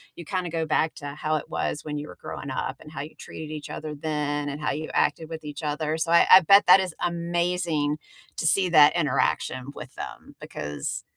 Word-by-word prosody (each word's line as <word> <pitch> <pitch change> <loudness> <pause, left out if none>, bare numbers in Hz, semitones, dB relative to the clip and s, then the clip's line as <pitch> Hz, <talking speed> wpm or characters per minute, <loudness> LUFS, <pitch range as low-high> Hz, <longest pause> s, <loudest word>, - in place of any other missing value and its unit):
you 170 - -8
kinda 180 +1 -3
go 165 -1 -2
back 155 0 +1
to 145 - -7
how 155 +1 -1
it 155 - -4
was 150 - -2
when 150 -1 -4
you 145 +1 -5
were - - -11
growing 140 - -7
up 130 0 -3
and 150 - -13
how - - -4
you 150 +2 -8
treated 155 -1 -9
each 150 -1 -7
other 155 -1 -6
then 145 -1 -2
and 145 +1 -5
how 150 - 0
you 155 +2 -4
acted 160 - +1
with 160 -1 -7
each 150 +1 -7
other. 150 +1 -1
So 160 +1 -1
I 170 - +7
I 185 - +12
bet 200 +4 +6
that 180 +2 +9
is 185 -3 -3
amazing 170 -3 0 0.4
to 160 - +1
see 185 +2 +3
that 155 -2 +7
interaction 145 -5 0
with - - -9
them - - -9
because, 75 -1 -5
155 Hz, 220 wpm, -25 LUFS, 150-170 Hz, 0.4 s, I